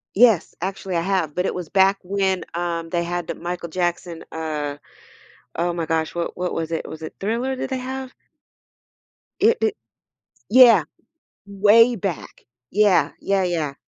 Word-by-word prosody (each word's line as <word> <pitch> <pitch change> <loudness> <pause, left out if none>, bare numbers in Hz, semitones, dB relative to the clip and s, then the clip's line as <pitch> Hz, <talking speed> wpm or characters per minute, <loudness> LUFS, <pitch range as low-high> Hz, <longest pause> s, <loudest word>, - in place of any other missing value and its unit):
Yes, 220 -4 +4
actually, 190 0 -4
I 170 - +1
have, 175 -5 -1
but 180 - 0
it - - -1
was 180 -3 -6
back 195 0 +4
when, 190 -1 0
um, 170 -1 -3
they 170 0 0
had 175 0 -3
Michael 175 0 -5
Jackson, 175 -1 -2
uh 150 -3 -4 0.8
oh 175 +1 0
my 170 -1 -2
gosh, 160 0 -1
what 170 0 -3
what 180 0 -2
was 165 0 -3
it, 165 - -3
was 160 - -9
it 160 - -7
Thriller 235 +6 -1
did 260 - -4
they 265 - -2
have? 260 0 -6 1.3
It 455 +3 +4
it 435 -1 +1 0.7
Yeah. 240 -1 +7 0.6
Way 210 +4 +5
back. 190 -5 -5 0.3
Yeah. 205 -2 +3
Yeah, 195 -1 +1
yeah. 160 -6 -2
180 Hz, 155 wpm, -22 LUFS, 170-205 Hz, 1.3 s, Yeah